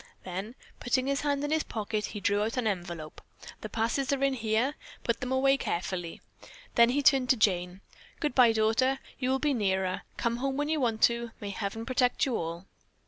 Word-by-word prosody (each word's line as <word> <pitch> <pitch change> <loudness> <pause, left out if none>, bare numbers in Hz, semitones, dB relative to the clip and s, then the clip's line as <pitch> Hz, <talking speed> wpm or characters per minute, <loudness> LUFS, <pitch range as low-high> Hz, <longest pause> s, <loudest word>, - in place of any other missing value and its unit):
Then 190 +6 -5 0.2
putting 255 +1 +1
his 275 +1 0
hand 285 -1 0
in 290 - -2
his 315 0 +3
pocket, 215 -3 -3
he 210 - -6
drew 200 +1 +1
out 220 +3 -1
an 250 - 0
envelope. 175 -6 -4 0.4
"The 215 - -6
passes 230 +6 0
are 275 -1 0
in 275 -1 +3
here. 230 +3 0 0.3
Put 235 -1 0
them 255 0 -4
away 270 +1 +3
carefully." 175 -5 -3 0.5
Then 235 0 +6
he 285 +3 +1
turned 265 -3 +4
to 260 - +5
Jane. 180 -3 +1 0.4
"Goodbye, 250 -6 +4
daughter. 225 +5 +2 0.2
You 255 -1 0
will 265 - +2
be 290 +1 +1
nearer. 190 -5 0 0.2
Come 235 0 0
home 270 +2 -2
when 295 +1 -1
you 315 -1 +1
want 230 -4 0
to. 235 0 +3
May 205 -1 -5
heaven 215 +3 -4
protect 250 0 +2
you 260 -4 -1
all." 170 +1 -4
235 Hz, 195 wpm, -29 LUFS, 205-265 Hz, 0.5 s, Then